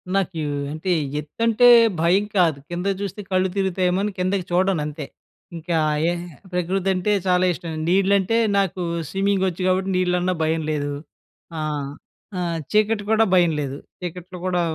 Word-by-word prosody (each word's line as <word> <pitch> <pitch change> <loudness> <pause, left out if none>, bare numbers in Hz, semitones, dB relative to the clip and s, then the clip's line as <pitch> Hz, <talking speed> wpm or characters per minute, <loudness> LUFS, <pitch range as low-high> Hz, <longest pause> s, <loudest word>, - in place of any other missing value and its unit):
నాకు 190 -4 -1 0.3
అంటే 160 +5 -3 0.3
ఎత్తంటే 230 - +2 0.3
భయం 180 +5 +3
కాదు, 165 -5 +3
కిందకి 180 +3 -2
చూస్తే 200 +1 -4
కళ్ళు 185 0 +2
తిరుగుతాయేమో 185 -1 +1
అని 210 - -1
కిందకి 185 0 -1
చూడను 185 -1 +2
అంతే, 150 0 -5 0.5
ఇంకా 170 +1 -3 0.3
ఏ - - +1 0.4
ప్రకృతి 180 +2 0
అంటే 185 +3 0 0.2
చాలా 180 0 +3
ఇష్టం, 165 -1 -7 0.2
నీళ్లంటే 195 +3 +3 0.2
నాకు 190 -2 0 0.3
స్విమ్మింగ్ 195 0 +1
వచ్చు 180 0 -4
కాబట్టి 185 +1 +1
నీళ్లన్న 180 0 +1
భయం 160 0 0
లేదు, 145 -1 -2 0.7
ఆ! - - -2 0.8
ఆహ్, 170 -2 -2
చీకటి 215 0 +2
కూడా 220 0 +4
భయం 175 -2 +5
లేదు 140 -2 -3 0.3
చీకట్లో 180 +1 -7
కూడా 180 -1 +1
185 Hz, 140 wpm, -22 LUFS, 170-195 Hz, 0.8 s, భయం